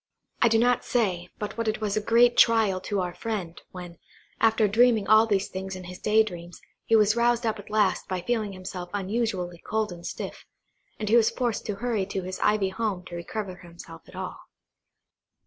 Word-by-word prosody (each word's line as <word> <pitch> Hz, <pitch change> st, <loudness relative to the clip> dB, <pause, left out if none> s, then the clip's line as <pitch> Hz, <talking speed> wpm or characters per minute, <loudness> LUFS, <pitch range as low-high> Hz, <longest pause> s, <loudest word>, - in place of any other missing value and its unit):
I -, -, +6 dB
do 225 Hz, -1 st, +3 dB
not 245 Hz, +2 st, +3 dB
say, 185 Hz, -7 st, -1 dB
but 210 Hz, +2 st, -5 dB
what 230 Hz, -, -1 dB
it 215 Hz, 0 st, 0 dB
was 210 Hz, -2 st, -1 dB
a 215 Hz, -, +1 dB
great 235 Hz, +3 st, +4 dB
trial 220 Hz, -5 st, +4 dB
to 200 Hz, 0 st, -2 dB
our 180 Hz, -1 st, -3 dB
friend, 195 Hz, -7 st, -5 dB
when, 175 Hz, -2 st, -10 dB, 0.4 s
after 220 Hz, -1 st, +3 dB
dreaming 225 Hz, 0 st, +4 dB
all 215 Hz, +2 st, +6 dB
these 200 Hz, -2 st, +1 dB
things 190 Hz, 0 st, -6 dB
in 185 Hz, -, -8 dB
his 180 Hz, +1 st, -9 dB
day 220 Hz, +1 st, +4 dB
dreams, 175 Hz, -4 st, -9 dB, 0.3 s
he 225 Hz, -, +3 dB
was 215 Hz, 0 st, +4 dB
roused 235 Hz, 0 st, +2 dB
up 220 Hz, -1 st, -1 dB
at 205 Hz, -, -11 dB
last 210 Hz, -2 st, +1 dB
by 185 Hz, -1 st, -3 dB
feeling 215 Hz, 0 st, -1 dB
himself 185 Hz, -1 st, -7 dB
unusually 195 Hz, -4 st, -2 dB
cold 215 Hz, +1 st, -2 dB
and 175 Hz, -1 st, -9 dB
stiff; -, -, -7 dB, 0.5 s
and 215 Hz, -, -4 dB
was 230 Hz, -1 st, +5 dB
forced 240 Hz, -4 st, -2 dB
to 210 Hz, -, -2 dB
hurry 220 Hz, -3 st, -1 dB
to 195 Hz, -1 st, -3 dB
his 185 Hz, +1 st, -6 dB
ivy 210 Hz, -2 st, +2 dB
home 190 Hz, -2 st, -3 dB
to 175 Hz, -, -8 dB
recover 190 Hz, +1 st, -5 dB
himself 170 Hz, -2 st, -12 dB
at -, -, -14 dB
all. -, -, -6 dB
210 Hz, 200 wpm, -26 LUFS, 185-225 Hz, 0.5 s, I